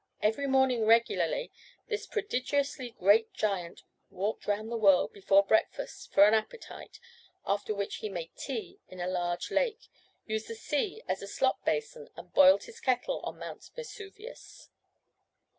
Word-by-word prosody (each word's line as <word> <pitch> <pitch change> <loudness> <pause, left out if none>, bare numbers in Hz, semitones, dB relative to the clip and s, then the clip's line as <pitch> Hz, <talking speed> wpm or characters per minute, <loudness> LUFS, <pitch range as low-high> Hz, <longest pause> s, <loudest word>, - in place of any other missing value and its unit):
Every 220 +7 +1
morning 265 -4 +3
regularly 235 - +2 0.4
this 430 -2 -3
prodigiously 280 - -1
great 210 +4 +4
giant 190 -5 -2 0.3
walked 200 +4 -3
round 210 +2 -1
the - - -2
world 195 -5 +4
before 200 0 +4
breakfast - - -1
for 200 - +7
an 210 - +4
appetite, 220 - -4 0.5
after 205 +1 -1
which 200 0 -3
he 215 - -5
made 170 -4 -6
tea 255 -6 -6
in 185 - -12
a 175 - -2
large 175 -1 -2
lake, 470 -1 0 0.4
used 220 0 -3
the 230 - -6
sea 365 - -2
as - - -2
a - - -7
slop - - 0
basin, 465 +1 -2
and - - -12
boiled 285 0 +7
his 470 -1 -12
kettle 255 - 0
on - - -6
Mount - - -9
Vesuvius. 445 -1 -10
230 Hz, 150 wpm, -30 LUFS, -, 0.5 s, for